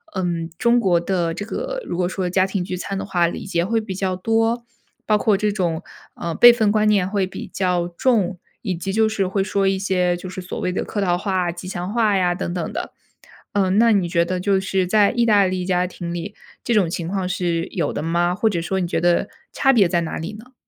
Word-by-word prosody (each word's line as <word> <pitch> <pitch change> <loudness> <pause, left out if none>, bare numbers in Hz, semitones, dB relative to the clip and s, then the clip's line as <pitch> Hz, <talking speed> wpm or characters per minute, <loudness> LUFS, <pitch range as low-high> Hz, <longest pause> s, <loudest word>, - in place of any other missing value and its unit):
嗯， 170 -3 -2
中 235 +4 +3
国 185 -6 +3
的 170 -2 -1
这 205 - -5
个 - - -4
如 - - -4
果 180 -1 0
说 185 -1 -2
家 185 +1 +3
庭 190 -1 -2
聚 180 0 -4
餐 195 +2 -4
的 - - -4
话， 175 -3 +1
礼 170 - -5
节 170 -3 0
会 225 +5 +1
比 215 -3 -5
较 185 0 -1
多， 225 +4 0 0.4
包 215 -1 +2
括 205 -1 +3
这 210 +1 0
种， 175 -6 -1 0.3
呃， 170 -1 -4
辈 240 +8 +9
份 220 -3 +2
观 215 0 +2
念 200 -4 +3
会 195 -1 0
比 - - -8
较 180 -2 0
重， 190 -1 +1 0.2
以 195 -5 -1
及 185 +3 -4
就 220 +2 +3
是 205 -3 -1
会 195 +1 0
说 195 0 0
一 195 0 +2
些 180 -2 +1
就 180 - -8
是 185 +1 -6
所 180 - -6
谓 180 - -1
的 180 - -2
客 210 - -4
套 180 -3 +2
话 185 -1 -1
啊、 - - -1
吉 175 +2 -9
祥 180 +1 -4
话 220 -4 +2
呀 180 -1 +2
等 175 - -4
等 175 - -3
的。 - - -4 0.6
嗯， 195 -1 +2
那 230 +1 +5
你 190 -5 +2
觉 170 -1 +2
得 180 +1 -2
就 195 +1 +2
是 190 -1 0
在 205 +1 +4
意 240 -1 +1
大 205 -3 +5
利 185 -1 -1
家 180 0 +1
庭 175 -1 -6
里， 175 +4 -5 0.3
这 235 - 0
种 200 -6 +3
情 170 0 -4
况 185 0 -2
是 175 -2 -1
有 170 - -2
的 - - -3
吗？ 170 +2 +1
或 220 +4 +1
者 180 -5 -1
说 190 +3 -1
你 180 - -1
觉 - - -1
得 175 +3 +2 0.2
差 270 - +3
别 220 -8 +4
在 170 0 +1
哪 165 - -4
里 165 +6 -5
呢？ 230 +5 -13
190 Hz, 265 characters per minute, -21 LUFS, 175-210 Hz, 0.6 s, 辈